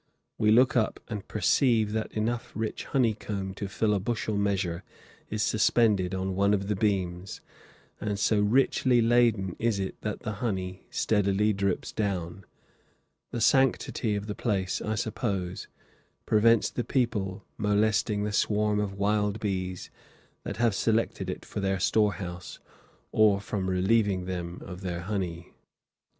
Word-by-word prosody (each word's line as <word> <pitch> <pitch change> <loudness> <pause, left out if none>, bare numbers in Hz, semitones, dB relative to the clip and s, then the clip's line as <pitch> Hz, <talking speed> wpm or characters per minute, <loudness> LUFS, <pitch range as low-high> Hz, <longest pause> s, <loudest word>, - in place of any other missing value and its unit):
We 105 - +3
look 125 +5 +5
up 110 -3 +1
and 105 -4 -5
perceive 110 +2 +2
that 110 0 -2
enough 115 +2 -2
rich 110 0 -3
honey 120 -5 +2
comb 100 -3 -5
to 100 +1 -5
fill 105 +2 0
a 100 - +1
bushel 110 +1 -2
measure 95 -4 -1 0.5
is 105 0 -1
suspended 105 -4 +2
on 95 0 -2
one 100 +2 +3
of 100 -1 -3
the 105 - +1
beams, 95 -2 -1 0.6
and 105 -1 -2
so 105 +1 +2
richly 125 +3 +3
laden 115 -5 +3
is 115 -2 +1
it 95 -1 -4
that 105 -1 -4
the 110 - -3
honey 95 -5 -3
steadily 105 0 +1
drips 100 -1 -1
down. 95 -3 -3 0.8
The 120 - -4
sanctity 125 -3 +2
of 100 0 -3
the 105 - -4
place, 95 -5 -1
I 110 - -2
suppose, 100 -4 -3 0.6
prevents 115 +1 +4
the 120 - -2
people 110 -8 -1
molesting 105 0 +1
the 105 - -1
swarm 105 0 +1
of 100 -2 -2
wild 105 +1 +1
bees 95 -3 -3 0.5
that - - -6
have 115 -1 +2
selected 110 -3 0
it 90 - -5
for - - -5
their 95 -1 0
storehouse, 90 -4 0 0.5
or 105 -2 +4
from 100 -2 -3
relieving 95 0 +2
them 90 -1 -5
of 90 -1 -8
their 90 -2 -3
honey. 90 -3 -4
105 Hz, 145 wpm, -28 LUFS, 95-110 Hz, 0.8 s, look